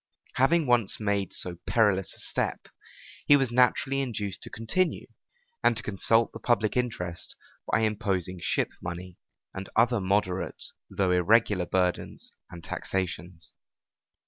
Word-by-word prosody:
Having 160 +5 +3
once 120 -5 +2
made 100 -3 0
so 90 -1 -4
perilous 100 -5 +2
a - - -12
step, - - -1 0.7
he 145 - +8
was 135 -3 0
naturally 125 +2 +3
induced 105 -7 -3
to - - -7
continue, 115 +12 -1 0.6
and 115 - +4
to 115 - -3
consult 115 +3 +3
the - - -7
public 110 -3 +1
interest 90 -9 -3 0.4
by 105 - +3
imposing 95 -4 -1
ship - - 0
money, 90 0 -6 0.4
and 95 0 -6
other 115 -1 +3
moderate 95 -1 -1 0.3
though 95 -2 0
irregular 90 0 +3
burdens 90 -1 -1 0.2
and 85 -2 -10
taxations. 90 -3 -3
100 Hz, 130 wpm, -28 LUFS, 90-120 Hz, 0.7 s, he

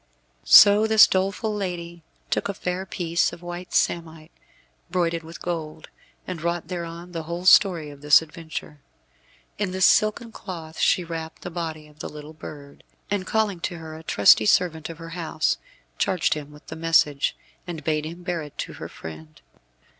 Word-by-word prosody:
So 205 +1 +8
this 220 0 +8
doleful 195 +3 -1
lady 175 -4 -5 0.3
took - - 0
a 200 - -3
fair 180 +1 -3
piece 170 -2 0
of 170 0 -11
white 175 +1 -7
samite, 160 -2 -1 0.6
broidered 170 -2 0
with 165 +1 -11
gold, 160 -2 -5 0.4
and 180 -4 -6
wrought 170 +1 -2
thereon 170 0 -6
the 165 -2 -4
whole 175 +1 -4
story 175 -6 +5
of 140 -1 -14
this 145 -1 +7
adventure. 160 -2 -8 0.8
In 205 -2 0
this 185 0 +3
silken 215 +2 +3
cloth 165 -7 -8
she 180 - +3
wrapped 165 -1 -7
the 180 - -6
body 160 -3 -5
of 150 0 -21
the - - -5
little 150 +1 -10
bird, 145 -2 -11 0.3
and 195 -2 -1
calling 215 -5 0
to 175 0 -4
her 160 -1 -9
a 160 - -9
trusty 110 -7 +5
servant 165 0 +2
of 165 - -8
her 165 0 -9
house, 165 -2 -1 0.4
charged 185 -4 +2
him 150 -1 -7
with 150 0 -16
the 160 - -8
message, 160 -3 +2 0.3
and 165 -3 -6
bade 155 0 0
him 170 +2 -9
bear 175 -2 -2
it 150 -2 -11
to - - -5
her - - -6
friend. 80 -1 -10
170 Hz, 175 wpm, -24 LUFS, 155-180 Hz, 0.8 s, So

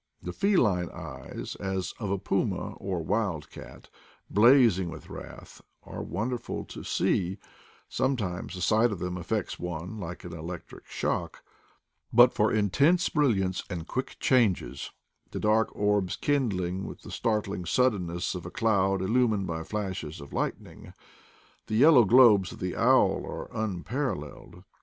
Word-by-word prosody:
The 90 - -5
feline 105 - +2
eyes, - - -8
as 95 -1 -3
of 105 - -3
a 100 - 0
puma 95 - -1
or 90 -4 -3
wild 95 -4 -1
cat, - - -12 0.4
blazing 110 -5 +5
with - - -10
wrath, - - -10 0.2
are - - -7
wonderful 120 +6 -3
to - - -9
see; 95 +1 0 0.5
sometimes 100 -9 -2
the 90 - -6
sight 110 +5 +3
of 100 - -3
them 90 +1 -4
affects 90 +4 -3
one 90 +4 -5
like 85 -2 -7
an 85 - -8
electric 85 +1 -8
shock; - - -3 0.7
but 120 +1 +7
for 105 - +2
intense 140 - +3
brilliance 100 - +1
and 85 -3 -5
quick 130 - -3
changes, 105 - +1 0.4
the - - -5
dark 110 +1 +2
orbs 105 -3 +1
kindling 95 -10 -1
with - - -10
the - - -10
startling 105 -4 -1
suddenness 90 -5 0
of 90 -2 -6
a 85 - -6
cloud 95 -3 +1
illumined 110 -1 +2
by 80 -2 -3
flashes 95 -5 -4
of 70 -1 -11
light - - -1
ning, - - -14 0.7
the 110 - -2
yellow 130 0 +7
globes 105 -5 +6
of - - -10
the 90 -1 -3
owl - - +3
are - - -7
unparalleled. 110 - -4
100 Hz, 145 wpm, -28 LUFS, 90-115 Hz, 0.7 s, but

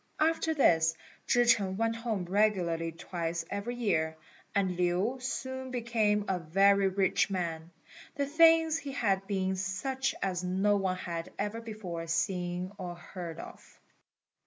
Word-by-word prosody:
After 320 0 +2
this, 165 - +4 0.3
Chih 245 0 +4
ch'eng 200 -6 +3
went 225 +1 +1
home 225 -6 -2
regularly 175 -4 +1
twice 165 0 -4
every 200 +5 -3
year, 160 -9 0 0.4
and 190 -3 +1
Lin 180 +8 0
soon 260 0 -4
became 225 -4 +1
a 185 -1 0
very 195 +4 +4
rich 190 +1 +2
man, 170 -4 -3 0.5
the 280 - 0
things 325 +1 +5
he 285 -4 -6
had 195 -7 0
being 190 -2 0
such 260 +8 -2
as 185 -2 -1
no 190 +3 +2
one 190 -2 -1
had 170 -2 -5
ever 210 +3 -3
before 190 -7 -6
seen 175 +2 -1
or 175 -2 -5
heard 175 -1 -8
of. - - -12
195 Hz, 140 wpm, -30 LUFS, 175-230 Hz, 0.5 s, things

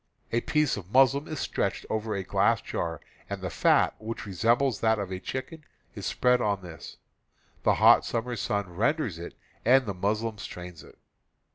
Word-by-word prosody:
A 115 - +1
piece 150 -2 +1
of 95 -1 -9
muslin 135 +3 +4
is 155 -3 -5
stretched - - -2
over 110 -1 -2
a 95 - -2
glass - - +2
jar, 80 -3 -4 0.3
and 100 -1 -4
the 95 -2 -4
fat, - - +3
which 110 +1 -6
resembles 115 +6 +1
that 110 0 +3
of 100 -2 -4
a 95 - -3
chicken, 130 - -6 0.3
is - - -5
spread 125 0 +2
on 100 -3 0
this. 85 -3 -10 0.6
The - - +3
hot - - +6
summer 120 +1 -2
sun 100 -2 -1
ren 115 - +2
ders 115 - -4
it, 85 - -8 0.3
and 130 +2 +5
the 100 - -3
muslin 105 +3 -1
strains 90 -4 -8
it. - - -16
110 Hz, 180 wpm, -27 LUFS, 95-125 Hz, 0.6 s, hot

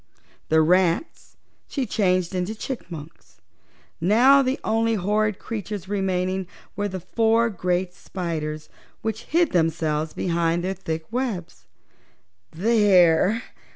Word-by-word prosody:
The 160 0 +5
rats 180 - +1 0.3
she 275 -3 -2
changed 185 -5 +1
into 185 +4 -2
chipmunks. 170 - -8 0.6
Now 245 +10 +6
the 260 0 -1
only 225 +1 +1
horrid 210 +1 0
creatures 205 -3 -6
remaining 190 -2 -1 0.3
were 205 0 -1
the 190 -1 -5
four 225 +4 +2
great 180 -1 -1
spiders, 155 -5 -5 0.4
which 220 +1 -3
hid 335 0 +2
themselves 160 -2 0
behind 170 -1 0
their 190 +1 -1
thick 160 -4 -5
webs. 230 -9 -4 0.8
"There!" 200 +1 +3
190 Hz, 110 wpm, -24 LUFS, 170-220 Hz, 0.8 s, Now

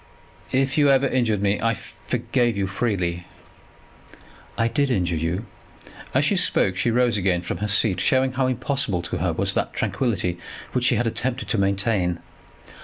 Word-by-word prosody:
"If 135 +3 +1
you 145 -1 +5
ever 135 0 +4
injured 115 -6 0
me, 100 0 +1
I 115 0 +1
forgave 120 -1 -2
you 100 - 0
freely." 95 -4 -2 1.3
"I 115 - +2
did 140 +3 0
injure 90 -8 0
you 85 +7 -2 0.3
" - - -17
As - - +3
she - - +2
spoke 95 - +3
she 120 - 0
rose 120 -1 +2
again 90 -3 0
from 90 - -4
her 105 - -2
seat, 100 -1 +2
showing 130 0 +2
how 130 0 0
impossible 125 -7 -1
to - - -4
her - - 0
was - - 0
that - - -1
tranquillity 95 -9 -1 0.3
which 125 -1 0
she - - +4
had 120 - 0
attempted 125 +3 -1
to 110 - +1
maintain. 100 -2 +1
110 Hz, 175 wpm, -23 LUFS, 95-125 Hz, 1.3 s, you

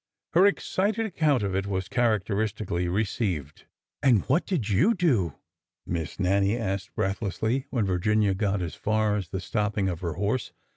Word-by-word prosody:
Her 180 +4 +6
excited 205 +2 0
account 155 - +1
of 95 -2 -1
it 95 +1 -1
was 95 -2 -2
characteristically 105 -5 0
re 100 +5 +1
ceived. 85 - -3 0.4
"And 120 -7 +4
what 145 +8 +2
did 155 - -1
you 150 - +3
do?'' 120 - +1 0.5
Miss 85 -1 -4
Nannie 100 +3 +2
asked 100 -4 -3
breath 95 +1 -1
lessly, 110 +6 -1
when 115 -5 0
Virginia 100 +2 +2
got 100 -1 0
as 85 - -4
far 110 -1 +1
as 95 -4 -3
the 95 - -3
stopping 105 +1 -1
of 85 -3 -4
her 85 -3 -2
horse. 105 +6 -2
105 Hz, 165 wpm, -27 LUFS, 95-120 Hz, 0.5 s, Her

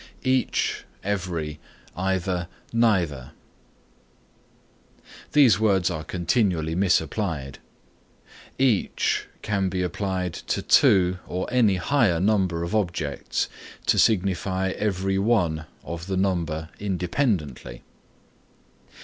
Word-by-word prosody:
EACH, 130 -1 0 0.2
EVERY, 85 -6 -3 0.4
EITHER, 95 -1 -1 0.3
NEITHER 90 - +1 2.0
These 125 -10 +6
words 95 -4 +2
are 80 -2 -4
continually 85 -3 0
misapplied. 80 -5 0 1.0
Each 130 -7 +1 0.2
can 100 -2 0
be 90 0 -1
applied 90 -1 -2
to - - -3
two 90 -1 +4
or 90 +1 -3
any 115 -6 +4
higher 100 -4 +2
number 95 -4 +1
of 85 - -4
objects 85 -9 -1 0.4
to - - +3
signify 95 -2 +2
every 95 -1 -1
one 90 -8 +1 0.2
of 85 +2 -6
the 95 -1 -1
number 85 -5 -1
independently. 90 - -2
95 Hz, 90 wpm, -25 LUFS, 85-100 Hz, 2.0 s, These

